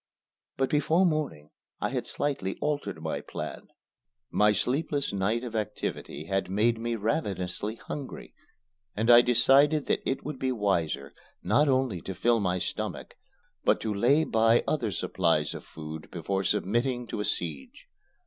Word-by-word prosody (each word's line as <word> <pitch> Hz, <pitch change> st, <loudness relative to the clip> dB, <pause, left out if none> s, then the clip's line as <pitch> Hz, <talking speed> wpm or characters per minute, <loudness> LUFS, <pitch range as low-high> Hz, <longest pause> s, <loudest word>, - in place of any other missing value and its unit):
But 135 Hz, -1 st, 0 dB
before 155 Hz, +5 st, +3 dB
morning 150 Hz, -, -1 dB, 0.3 s
I -, -, -1 dB
had -, -, -3 dB
slightly 135 Hz, -10 st, -2 dB
altered 150 Hz, -1 st, -2 dB
my -, -, -2 dB
plan. -, -, -7 dB, 0.6 s
My 105 Hz, 0 st, +4 dB
sleepless 140 Hz, -, -1 dB
night 105 Hz, +5 st, 0 dB
of 120 Hz, -2 st, -6 dB
activity 105 Hz, -8 st, -4 dB
had 95 Hz, +2 st, -1 dB
made 110 Hz, +4 st, +2 dB
me 115 Hz, 0 st, -1 dB
ravenously 105 Hz, -, -1 dB
hungry, 140 Hz, +3 st, -7 dB, 0.6 s
and 115 Hz, +3 st, +3 dB
I 120 Hz, 0 st, +10 dB
decided 140 Hz, +5 st, +4 dB
that -, -, +1 dB
it 135 Hz, -, -2 dB
would 145 Hz, -3 st, -5 dB
be 130 Hz, -1 st, 0 dB
wiser 85 Hz, -, -1 dB, 0.3 s
not 150 Hz, +1 st, +3 dB
only 130 Hz, -9 st, +1 dB
to 95 Hz, -, -6 dB
fill 120 Hz, -1 st, +3 dB
my 90 Hz, -3 st, 0 dB
stomach, -, -, -4 dB, 0.5 s
but -, -, +3 dB
to 110 Hz, -1 st, -1 dB
lay 130 Hz, +10 st, +4 dB
by 115 Hz, -3 st, +3 dB
other 120 Hz, -9 st, 0 dB
supplies 85 Hz, -4 st, 0 dB
of -, -, -8 dB
food 80 Hz, 0 st, -9 dB
before 95 Hz, +3 st, -2 dB
submitting 120 Hz, +7 st, 0 dB
to 110 Hz, -, -5 dB
a 105 Hz, -, -1 dB
siege. 80 Hz, -8 st, -4 dB
115 Hz, 150 wpm, -28 LUFS, 95-135 Hz, 0.6 s, I